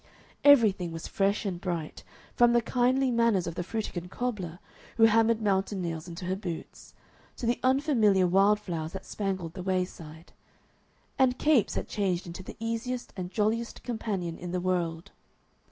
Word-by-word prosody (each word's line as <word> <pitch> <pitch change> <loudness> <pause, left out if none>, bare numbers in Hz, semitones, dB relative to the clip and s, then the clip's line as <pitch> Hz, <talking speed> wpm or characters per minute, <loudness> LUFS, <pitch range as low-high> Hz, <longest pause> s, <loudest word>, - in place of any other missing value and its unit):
Everything 215 -11 +5
was 165 -1 -6
fresh 200 +2 0
and 180 -3 -3
bright, 170 -5 -4 0.3
from 240 0 +5
the 240 - +4
kindly 255 +2 +2
manners 230 -6 +2
of 170 - -4
the 175 - -3
Frutigen 180 -3 -4
cobbler, 190 -7 -3 0.4
who 225 - +4
hammered 225 0 +4
mountain 195 0 +1
nails 165 -1 -4
into 170 +1 -7
her 185 +1 -1
boots, 180 -4 -7 0.4
to 245 - -4
the 235 +1 +1
unfamiliar 255 -8 +3
wild 195 +4 +4
flowers 165 -5 -5
that 190 - -7
spangled 190 -5 -3
the 185 - -6
wayside. 180 -3 -4 0.9
And 255 -1 +4
Capes 295 -8 +3
had - - -3
changed 190 -4 -1
into 175 +2 -7
the - - -10
easiest 230 +2 -3
and 180 -2 -5
jolliest 220 +3 -1
companion 200 -8 -3
in 175 - -6
the 180 - -1
world. 175 -1 -2
195 Hz, 160 wpm, -28 LUFS, 175-230 Hz, 0.9 s, Everything